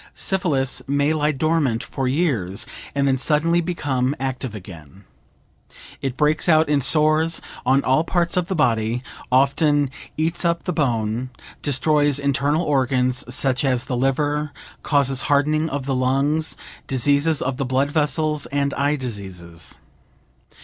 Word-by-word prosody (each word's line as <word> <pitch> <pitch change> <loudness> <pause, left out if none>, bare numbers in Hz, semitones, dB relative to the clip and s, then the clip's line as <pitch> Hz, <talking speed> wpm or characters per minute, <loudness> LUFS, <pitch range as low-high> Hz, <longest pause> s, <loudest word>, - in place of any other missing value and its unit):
Syphilis 155 -9 +1
may 140 +2 +1
lie 150 -1 +1
dormant 145 -5 0
for 135 -2 -3
years, 120 - -1 0.3
and 140 0 +1
then 130 -1 +1
suddenly 165 +4 +2
become 145 -6 -1
active 130 -3 -3
again. 90 -3 -12 1.0
It 135 -2 -3
breaks 155 +3 +1
out 160 0 +5
in 145 -1 +2
sores 155 +3 +3 0.3
on 135 +2 +3
all 135 +5 +2
parts 170 +1 0
of 180 -2 0
the 190 - -2
body, 115 -4 0 0.3
often 140 +2 +2 0.3
eats 165 +3 -1
up 170 -1 0
the 180 - -2
bone, 120 -4 -1 0.3
destroys 145 +1 +2
internal 145 +3 0
organs, 130 -3 +1
such 130 0 +1
as 125 -3 +1
the 125 - -3
liver, 145 +3 0 0.3
causes 135 -3 +1
hardening 150 +2 +2
of 140 -2 -4
the 135 - -1
lungs, 135 +5 +1 0.3
diseases 140 +4 +2
of 130 0 -2
the 135 - -2
blood 130 +3 0
vessels 150 -2 0
and 140 +2 -1
eye 145 +1 +1
diseases. 90 - -6
140 Hz, 140 wpm, -21 LUFS, 130-155 Hz, 1.0 s, out